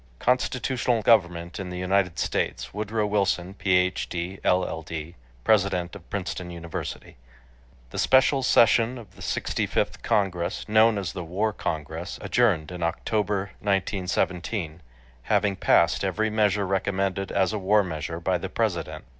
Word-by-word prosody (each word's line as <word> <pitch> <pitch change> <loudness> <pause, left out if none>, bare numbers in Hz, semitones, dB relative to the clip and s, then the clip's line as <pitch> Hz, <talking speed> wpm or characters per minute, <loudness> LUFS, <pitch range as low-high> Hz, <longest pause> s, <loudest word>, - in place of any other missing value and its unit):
—"Constitutional 125 - 0
Government 85 -6 +2
in 95 -2 -5
the 90 - -5
United 90 -1 +1
States." - - -2
Woodrow 105 +1 -1
Wilson, 100 -3 0
Ph.D., 90 -1 0
LL.D., 80 -2 -1 0.3
President 95 -2 +2
of 90 -4 -13
Princeton 90 -2 -4
University. 85 -1 -7 0.7
The - - -4
special 130 +1 +4
session 120 -1 +4
of 105 -5 -12
the - - -15
65th - - -1
Congress, 90 -4 -1
known 110 0 +5
as 95 -5 -3
the 90 -2 -5
"War 100 +6 -1
Congress," 80 +1 -4
adjourned 95 -10 +1
in 90 0 -7
October, 100 +3 -1
1917, 95 -3 -1 0.5
having 100 -2 +2
passed 85 -2 +3
every 105 +3 0
measure 105 -2 +2
recommended 95 0 -1
as 95 +1 +1
a 105 - -1
war 100 +2 +3
measure 80 -2 -4
by 90 +1 0
the 95 - -5
President. 85 - -2
95 Hz, 130 wpm, -25 LUFS, 85-105 Hz, 0.7 s, known